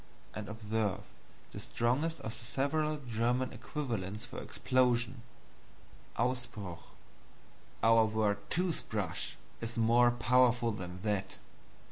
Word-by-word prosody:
And 105 Hz, -1 st, -5 dB
observe 110 Hz, -2 st, -1 dB, 0.5 s
the -, -, -6 dB
strongest 140 Hz, +8 st, 0 dB
of 110 Hz, -, -4 dB
the 115 Hz, +1 st, -10 dB
several 150 Hz, +5 st, 0 dB
German 120 Hz, +3 st, +1 dB
equivalents 115 Hz, -7 st, -4 dB
for 120 Hz, -, -7 dB
explosion 125 Hz, -1 st, +1 dB, 1.0 s
AUSBRUCH. 120 Hz, -7 st, -2 dB, 1.0 s
Our 115 Hz, 0 st, +7 dB
word 105 Hz, -1 st, +1 dB
Toothbrush 115 Hz, -, -1 dB, 0.3 s
is 115 Hz, 0 st, -3 dB
more 120 Hz, +2 st, +5 dB
powerful 120 Hz, 0 st, +4 dB
than 90 Hz, -2 st, -6 dB
that. 105 Hz, -3 st, -1 dB
115 Hz, 100 wpm, -33 LUFS, 105-125 Hz, 1.0 s, Our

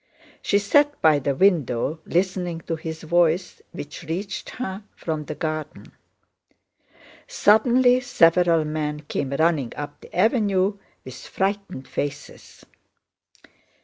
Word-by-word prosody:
She 200 Hz, -, +2 dB
sat 290 Hz, +9 st, +2 dB
by 155 Hz, -2 st, +4 dB
the 140 Hz, 0 st, -1 dB
window 155 Hz, -5 st, +1 dB
listening 180 Hz, -2 st, -1 dB
to 165 Hz, -, -3 dB
his 160 Hz, 0 st, -7 dB
voice 170 Hz, +2 st, +1 dB
which 145 Hz, +4 st, -8 dB
reached 195 Hz, +6 st, -4 dB
her 205 Hz, -5 st, -6 dB
from 155 Hz, -2 st, -4 dB
the -, -, -6 dB
garden. 155 Hz, -1 st, -5 dB, 1.4 s
Suddenly 245 Hz, -, +4 dB
several 170 Hz, -9 st, +3 dB
men 150 Hz, -1 st, -3 dB
came 140 Hz, -2 st, -3 dB
running 145 Hz, -3 st, +1 dB
up 145 Hz, 0 st, -7 dB
the -, -, -14 dB
avenue 200 Hz, -1 st, +2 dB, 0.3 s
with 130 Hz, 0 st, -10 dB
frightened 195 Hz, -8 st, -3 dB
faces. 140 Hz, 0 st, -6 dB
170 Hz, 115 wpm, -23 LUFS, 150-200 Hz, 1.4 s, by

